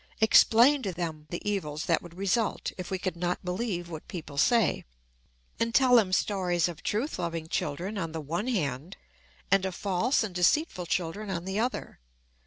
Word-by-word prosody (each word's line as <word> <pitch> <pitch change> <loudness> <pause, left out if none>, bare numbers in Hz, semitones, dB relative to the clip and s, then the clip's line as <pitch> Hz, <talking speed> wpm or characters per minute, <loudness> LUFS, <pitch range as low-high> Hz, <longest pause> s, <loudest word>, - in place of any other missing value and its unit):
Explain 235 +5 +6
to 195 - -2
them 160 -3 -5
the 175 - -5
evils 155 -7 -2
that 165 - +2
would 175 0 -13
result 200 +3 0
if 185 -1 -7
we 190 - -1
could 185 -1 -3
not 175 +1 -2
believe 180 -1 -2
what 160 -2 -8
people 155 -5 -7
say, 230 - +3 0.8
and 230 0 0
tell 255 -2 +6
them 200 -5 +3
stories 180 -3 +1
of 175 -1 -7
truth 225 +2 -2
loving 165 -2 -3
children 175 +7 -3
on 165 -3 -3
the 160 - -4
one 165 - -3
hand, 155 - -2 0.5
and 195 -1 +4
of 190 -2 -3
false 205 +8 +1
and 205 -4 -4
deceitful 180 - +1
children 185 +5 -2
on 175 -2 -3
the 190 +2 -2
other. 245 - -3
185 Hz, 180 wpm, -28 LUFS, 170-215 Hz, 0.8 s, Explain